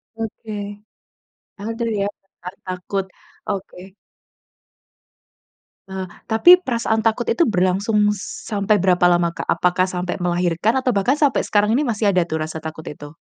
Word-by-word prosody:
Oke. 225 Hz, 0 st, -6 dB, 1.1 s
Ada 230 Hz, +2 st, -3 dB
ya, 200 Hz, -, +1 dB, 0.2 s
benar 185 Hz, -1 st, -11 dB
takut. 185 Hz, +1 st, -3 dB, 0.4 s
Oke. 190 Hz, -1 st, -6 dB, 1.9 s
Nah, 190 Hz, 0 st, -5 dB, 0.2 s
tapi 345 Hz, +11 st, +7 dB
perasaan 230 Hz, -7 st, -1 dB
takut 225 Hz, +2 st, +1 dB
itu 340 Hz, -, +3 dB
berlangsung 205 Hz, +2 st, +2 dB, 0.3 s
sampai 210 Hz, 0 st, +1 dB
berapa 180 Hz, -2 st, +3 dB
lama, 175 Hz, -1 st, +3 dB
Kak? -, -, -7 dB
Apakah 180 Hz, +1 st, +2 dB
sampai 180 Hz, 0 st, -3 dB
melahirkan 175 Hz, +4 st, +1 dB
atau 255 Hz, -, +2 dB
bahkan 215 Hz, +6 st, +2 dB
sampai 290 Hz, -2 st, +1 dB
sekarang 210 Hz, +1 st, +2 dB
ini 275 Hz, +3 st, +2 dB
masih 210 Hz, -3 st, +1 dB
ada 180 Hz, -3 st, +1 dB
tuh 160 Hz, -1 st, -2 dB
rasa 160 Hz, 0 st, -5 dB
takut 160 Hz, 0 st, -7 dB
itu? 145 Hz, +1 st, -11 dB
195 Hz, 135 wpm, -21 LUFS, 180-225 Hz, 1.9 s, tapi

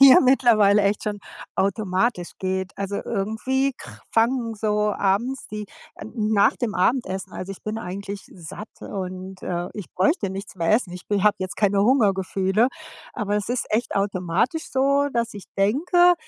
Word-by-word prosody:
ja 270 Hz, -1 st, +10 dB
mittlerweile 225 Hz, -6 st, +5 dB
echt 200 Hz, +1 st, +1 dB
schon 210 Hz, -1 st, -2 dB, 0.4 s
automatisch 190 Hz, 0 st, 0 dB
geht. 190 Hz, 0 st, -2 dB
Also, 200 Hz, 0 st, -3 dB
irgendwie 235 Hz, +6 st, 0 dB
kr -, -, -12 dB
fangen 230 Hz, 0 st, +2 dB
so 210 Hz, -1 st, +1 dB
abends, 230 Hz, +7 st, 0 dB
die, 210 Hz, 0 st, -5 dB, 0.3 s
äh, -, -, -9 dB
nach 215 Hz, 0 st, +3 dB
dem 240 Hz, -5 st, -2 dB
Abendessen 190 Hz, -2 st, 0 dB
also 185 Hz, +2 st, -5 dB
ich 195 Hz, -, -13 dB
bin 215 Hz, +1 st, -3 dB
eigentlich 200 Hz, +1 st, -6 dB
satt 190 Hz, +5 st, -9 dB
und, 185 Hz, -1 st, -6 dB
äh, 175 Hz, 0 st, -2 dB
ich 205 Hz, -5 st, -7 dB
bräuchte 195 Hz, -, +1 dB
nichts 195 Hz, +1 st, -7 dB
mehr 170 Hz, -3 st, 0 dB
essen. 215 Hz, -5 st, +2 dB
Ich 180 Hz, -, -9 dB
b 205 Hz, -2 st, 0 dB
habe 210 Hz, 0 st, +4 dB
jetzt 185 Hz, -1 st, -4 dB
keine 200 Hz, -1 st, +3 dB
Hungergefühle, 200 Hz, -2 st, +2 dB, 0.5 s
aber 210 Hz, -3 st, -1 dB
es 210 Hz, +1 st, -2 dB
ist 245 Hz, -1 st, -1 dB
echt 220 Hz, +3 st, 0 dB
automatisch 195 Hz, -, 0 dB
so, 280 Hz, +2 st, +2 dB
dass 235 Hz, 0 st, 0 dB
ich 200 Hz, -, -8 dB
denke, 350 Hz, -, +4 dB
205 Hz, 160 wpm, -24 LUFS, 190-235 Hz, 0.5 s, ja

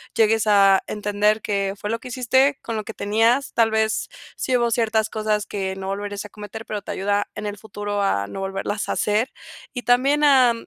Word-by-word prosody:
llegues 220 Hz, 0 st, +3 dB
a 195 Hz, -2 st, +5 dB
entender, 210 Hz, +1 st, 0 dB
qué 200 Hz, -1 st, -1 dB
fue 205 Hz, -, -5 dB
lo 230 Hz, +1 st, -1 dB
que 255 Hz, -, -10 dB
hiciste 260 Hz, +3 st, +2 dB
con 230 Hz, -, -4 dB
lo 215 Hz, -, -4 dB
que 225 Hz, -, -6 dB
tenías. 225 Hz, +7 st, +1 dB
Tal 230 Hz, -1 st, +3 dB
vez, 220 Hz, 0 st, 0 dB, 0.3 s
sí 260 Hz, -, 0 dB
hubo 240 Hz, -1 st, +2 dB
ciertas 220 Hz, -1 st, +1 dB
cosas 215 Hz, -1 st, -1 dB
que 190 Hz, -1 st, -3 dB
no 190 Hz, 0 st, -6 dB
volverías 205 Hz, 0 st, -4 dB
a 210 Hz, -, -10 dB
cometer, 210 Hz, +2 st, -9 dB
pero 210 Hz, -1 st, -4 dB
te -, -, -7 dB
ayuda 205 Hz, +1 st, 0 dB
en 210 Hz, -, -5 dB
el 205 Hz, 0 st, -5 dB
futuro 205 Hz, 0 st, -4 dB
a 100 Hz, -, 0 dB
no 195 Hz, -, -7 dB
volverlas 195 Hz, +2 st, -3 dB
a -, -, 0 dB
hacer. 215 Hz, +5 st, +1 dB, 0.4 s
Y 245 Hz, -, -4 dB
también, 275 Hz, +5 st, +3 dB
a 260 Hz, -5 st, +6 dB
215 Hz, 210 wpm, -22 LUFS, 205-230 Hz, 0.4 s, a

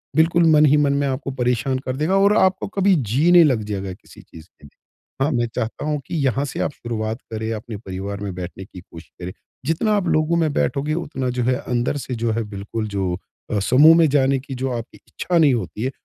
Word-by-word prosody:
बिल्कुल 165 Hz, +2 st, +4 dB
मन 150 Hz, 0 st, +6 dB
ही 150 Hz, +1 st, +4 dB
मन 145 Hz, -1 st, +2 dB
में 140 Hz, 0 st, 0 dB
आपको 135 Hz, +1 st, -3 dB
परेशान 125 Hz, 0 st, 0 dB
कर 130 Hz, 0 st, -2 dB
देगा 155 Hz, +7 st, 0 dB
और 200 Hz, +2 st, +4 dB
आपको 190 Hz, 0 st, +2 dB
कभी 195 Hz, -1 st, +2 dB
जी 135 Hz, +6 st, +1 dB
नहीं 175 Hz, -1 st, +8 dB
लग 130 Hz, -8 st, +2 dB
जाएगा 100 Hz, -2 st, -4 dB
किसी -, -, -16 dB
चीज़ 80 Hz, -1 st, -14 dB
के -, -, -32 dB
लिए। 70 Hz, -, -19 dB, 0.4 s
हाँ, 140 Hz, -, +2 dB
मैं 120 Hz, -3 st, 0 dB
चाहता 115 Hz, +6 st, -3 dB
हूँ 150 Hz, -1 st, -1 dB
कि 175 Hz, -, -4 dB
यहाँ 135 Hz, +1 st, +1 dB
से 135 Hz, -, -6 dB
आप -, -, -1 dB
शुरुआत 110 Hz, -3 st, -4 dB
करें, 110 Hz, 0 st, -3 dB
अपने 110 Hz, 0 st, -6 dB
परिवार 100 Hz, 0 st, -6 dB
में 100 Hz, -2 st, -4 dB
बैठने 90 Hz, +1 st, -7 dB
की 95 Hz, -, -12 dB
कोशिश 85 Hz, -1 st, -14 dB
करें। 90 Hz, -, -5 dB, 0.3 s
जितना 165 Hz, +8 st, +1 dB
आप 180 Hz, -3 st, -1 dB
लोगों 155 Hz, +2 st, +2 dB
में 160 Hz, -2 st, +1 dB
बैठोगे, 145 Hz, +2 st, 0 dB
उतना 145 Hz, -6 st, -3 dB
जो 125 Hz, -, +1 dB
है 125 Hz, +2 st, +2 dB
अंदर 125 Hz, +2 st, -2 dB
से 130 Hz, -1 st, -5 dB
जो 115 Hz, 0 st, -1 dB
है 115 Hz, +1 st, -1 dB
बिल्कुल 105 Hz, +2 st, -5 dB
जो 95 Hz, -3 st, -2 dB, 0.4 s
अ, 105 Hz, -, +1 dB
समूह 145 Hz, +10 st, +6 dB
में 165 Hz, -2 st, +5 dB
जाने 135 Hz, -1 st, +2 dB
की 135 Hz, +1 st, -9 dB
जो 130 Hz, +1 st, -2 dB
आपकी 115 Hz, -, -9 dB
इच्छा 175 Hz, -1 st, -2 dB
नहीं 150 Hz, -5 st, +5 dB
होती 110 Hz, 0 st, -3 dB
है, 130 Hz, -, -1 dB
130 Hz, 230 wpm, -21 LUFS, 110-150 Hz, 0.4 s, नहीं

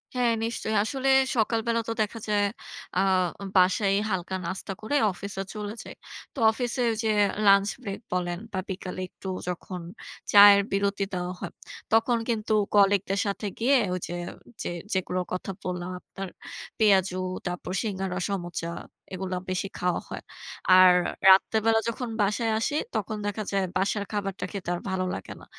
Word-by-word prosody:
হ্যাঁ 245 Hz, -2 st, +3 dB
নিশ্চয়ই। 225 Hz, -1 st, -2 dB
আসলে 270 Hz, +3 st, -1 dB, 0.3 s
সকালবেলা 230 Hz, +1 st, +1 dB
তো -, -, 0 dB
দেখা 215 Hz, +2 st, -2 dB
যায় 205 Hz, -1 st, +3 dB, 0.5 s
আ -, -, +4 dB, 0.6 s
বাসায় 190 Hz, +2 st, +4 dB, 0.2 s
হালকা 190 Hz, 0 st, -2 dB
নাস্তা 190 Hz, +2 st, -4 dB
করে 250 Hz, +7 st, -2 dB, 0.2 s
অফিসে 195 Hz, +1 st, -6 dB
চলে 210 Hz, 0 st, -5 dB
যাই। -, -, -10 dB, 0.4 s
তো -, -, -20 dB
অফিসে 245 Hz, +2 st, -2 dB
ওইযে 220 Hz, 0 st, -1 dB, 0.4 s
লাঞ্চ 200 Hz, 0 st, +6 dB
ব্রেক 200 Hz, -4 st, -5 dB
বলেন 175 Hz, -1 st, -1 dB
বা 190 Hz, -, -1 dB
বিকালে 185 Hz, 0 st, -5 dB
একটু 190 Hz, -, -11 dB, 0.2 s
যখন 180 Hz, 0 st, -5 dB, 0.5 s
চায়ের 200 Hz, 0 st, +9 dB
বিরতি 200 Hz, 0 st, 0 dB
দেওয়া 180 Hz, 0 st, -2 dB
হয়, -, -, -5 dB, 0.4 s
তখন 230 Hz, +2 st, +3 dB
কিন্তু 220 Hz, -1 st, 0 dB, 0.2 s
কলিগ 200 Hz, -1 st, +5 dB
দের 195 Hz, -, +1 dB
সাথে 200 Hz, +1 st, -3 dB
গিয়ে 265 Hz, +4 st, +4 dB, 0.2 s
ওইযে 175 Hz, -1 st, -4 dB, 0.5 s
যে -, -, -2 dB, 0.2 s
যেগুলো 185 Hz, -1 st, -1 dB
কথা 185 Hz, +1 st, -3 dB
বললাম, 180 Hz, 0 st, -3 dB
আপনার 195 Hz, 0 st, -8 dB, 0.5 s
পেঁয়াজু, 190 Hz, -3 st, +4 dB, 0.3 s
তারপর 180 Hz, 0 st, -4 dB
সিঙ্গারা, 190 Hz, -3 st, -3 dB
সমোচা 175 Hz, -3 st, -3 dB, 0.5 s
এগুলা 185 Hz, 0 st, -3 dB
বেশি 185 Hz, +2 st, -1 dB
খাওয়া 180 Hz, -1 st, 0 dB
হয়। -, -, -6 dB, 0.6 s
আর 185 Hz, -1 st, +8 dB, 0.4 s
রাত্রেবেলা 220 Hz, +3 st, +5 dB
যখন 240 Hz, +1 st, -4 dB
বাসায় 220 Hz, +3 st, +1 dB
আসি 290 Hz, +6 st, -1 dB, 0.2 s
তখন 215 Hz, -1 st, -2 dB
দেখা 205 Hz, +1 st, -2 dB
যায় 195 Hz, -1 st, +1 dB
বাসার 200 Hz, +2 st, 0 dB
খাবারটা 200 Hz, -2 st, -3 dB
খেতে 195 Hz, -4 st, -5 dB
আর 175 Hz, -, -5 dB
ভালো 185 Hz, 0 st, -1 dB
লাগে 95 Hz, -, -7 dB
না। -, -, -13 dB
200 Hz, 150 wpm, -27 LUFS, 185-220 Hz, 0.6 s, চায়ের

